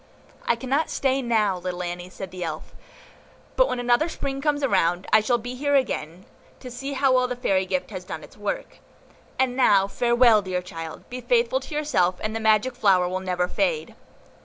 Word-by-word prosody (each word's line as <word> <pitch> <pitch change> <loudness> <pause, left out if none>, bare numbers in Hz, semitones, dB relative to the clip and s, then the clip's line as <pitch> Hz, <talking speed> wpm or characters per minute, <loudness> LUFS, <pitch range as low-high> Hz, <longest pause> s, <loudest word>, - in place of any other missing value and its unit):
"I 235 - +3
cannot 265 +6 -1
stay 270 0 0
now, 215 -6 +1
little 180 0 -4
Annie," 175 +1 -5
said 185 0 -8
the 180 -1 -6
Elf, 165 - -6 0.8
"but - - +4
when 250 - -2
another 245 +7 +2
Spring 275 -3 -4
comes 290 -1 +1
round, 180 -5 +1
I 215 - +8
shall 240 +3 +1
be 245 +2 -6
here 285 +3 0
again, 185 - -1 0.3
to 250 - -9
see 270 +3 -5
how 270 -1 +2
well 255 0 +3
the 250 - -3
fairy 190 -6 0
gift 185 +2 -2
has 185 -3 -6
done 165 -4 -7
its - - -14
work. 205 -1 -5 0.6
And 260 -1 +1
now 200 -7 +4
farewell, 235 0 +4
dear 185 -2 -3
child; 165 -2 -8
be 250 0 -5
faithful 485 - +2
to 320 - -8
yourself, 185 -13 +1
and 215 +1 -3
the - - -1
magic 220 +3 +2
flower 195 -7 +3
will 185 +1 -2
never 180 -1 -1
fade." 470 - -1
225 Hz, 195 wpm, -24 LUFS, 185-265 Hz, 0.8 s, I